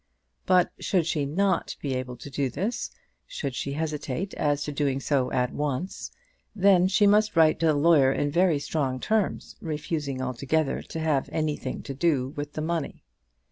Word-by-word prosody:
But 180 -1 +4
should 180 -5 +1
she 150 -4 0
not 185 +4 0
be 140 -2 -2
able 125 -1 -4
to 140 - -9
do 135 0 0
this, 200 - -3 0.4
should - - -4
she 140 - -3
hesitate 155 +3 -3
as 145 -1 0
to 150 - -4
doing 140 -2 0
so 135 -2 0
at 125 -1 0
once, 150 +5 -3 0.5
then 190 -2 +5
she 205 +2 +3
must 210 +1 +4
write 160 -1 +5
to 165 - +2
the 155 - +3
lawyer 145 -3 +5
in 145 +1 0
very 170 -1 +3
strong 140 -3 -2
terms, 215 - -1
refusing 150 -3 -3
altogether 135 +4 -1
to 160 - -7
have 155 -4 0
anything 150 -4 -2
to 135 - -5
do 135 -3 +1
with 145 0 -6
the 155 - -3
money. 165 -2 -3
150 Hz, 175 wpm, -26 LUFS, 140-170 Hz, 0.5 s, then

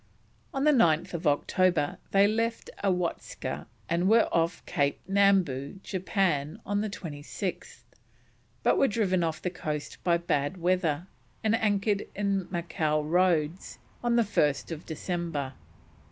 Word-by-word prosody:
On 270 -4 -1
9th 170 - +3
October 160 +2 +2
they 195 0 +5
left 225 +2 -1
Awatska 180 -3 -2 0.2
and 170 +3 +1
were 225 +1 +5
off 165 0 0
Cape 145 -5 0
Nambu, 195 -7 +2
Japan, 185 -3 -1
on 205 0 0
the 215 - -2
26th, 170 +1 -6 0.8
but - - +3
were 275 - +5
driven 195 -6 +1
off 160 -1 -1
the 180 - -1
coast 150 -4 -5
by 170 -1 +3
bad 155 0 -1
weather, 175 -3 +1 0.4
and 220 0 +2
anchored 205 -2 +1
in 195 -2 0
Macao 160 -3 -1
Roads 170 0 +1 0.3
on 240 -1 +2
1st 165 -7 +1
December. 160 -4 -3
180 Hz, 120 wpm, -28 LUFS, 155-200 Hz, 0.8 s, they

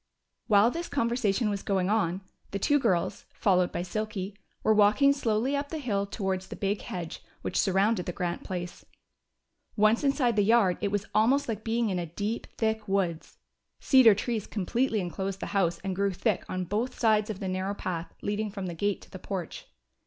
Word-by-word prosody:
While 210 +2 +5
this 340 +4 -5
conversation 235 -4 +1
was 200 -1 -3
going 190 -2 0
on, 190 -3 +1 0.3
the 200 - -3
two 290 +9 +3
girls, 185 -9 0
followed 185 -3 +2
by 175 - -2
Silky, 200 0 -4 0.3
were 220 - +4
walking 215 +7 +5
slowly 245 0 0
up 285 0 -2
the 320 - -4
hill 205 -8 -1
towards 190 -2 -2
the - - -7
big 200 +1 -1
hedge 170 -3 -6 0.2
which - - -1
surrounded 195 0 +2
the - - -1
Grant 175 0 -3
place. 175 -1 -5 0.9
Once 215 +3 +3
inside 275 -4 +2
the - - +5
yard, 205 -3 +3
it - - +1
was 205 0 -1
almost 265 +6 +3
like 220 -2 -3
being 225 -1 0
in 185 - -1
a 170 - -3
deep, 205 +7 -3
thick 220 -1 -1
woods. 185 -4 -1 0.4
Cedar 255 -6 +6
trees 220 0 -2
completely 225 +3 0
enclosed 190 +2 -4
the - - -4
house 175 -4 +2
and 190 -2 -2
grew 200 +1 +1
thick 210 +2 0
on 185 0 -2
both 210 +8 -2
sides 215 -2 +3
of 205 -3 -4
the 195 - -3
narrow 185 +2 -2
path 175 -3 -4
leading 210 +1 -1
from 195 -2 -5
the 175 - -4
gate 200 +4 -1
to - - -18
the 185 - -8
porch. 180 -3 -5
205 Hz, 190 wpm, -28 LUFS, 185-225 Hz, 0.9 s, Cedar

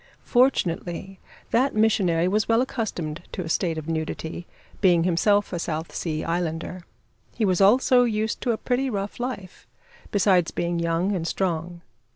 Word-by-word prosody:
Fortunately, 190 -6 0 0.3
that 255 +2 +2
missionary 195 -6 +2
was 210 +3 0
well 230 +2 +4
accustomed 175 -12 -4
to 185 - -3
a 165 - -6
state 165 -1 0
of 155 0 -6
nudity, 160 +1 -4 0.3
being 175 -4 +4
himself 200 +4 +2
a 175 - -2
South 160 0 -4
Sea 155 -2 -3
islander. 170 +1 -3 0.5
He 225 - +1
was 185 -1 +2
also 245 +5 +5
used 220 -1 -1
to 245 - +1
a 225 - -1
pretty 260 +3 -1
rough 200 -1 -4
life, 220 -7 -6 0.4
besides 185 -4 +3
being 170 0 -2
young 170 +3 0
and 165 -2 -2
strong. 170 -2 -2
185 Hz, 155 wpm, -24 LUFS, 170-215 Hz, 0.5 s, also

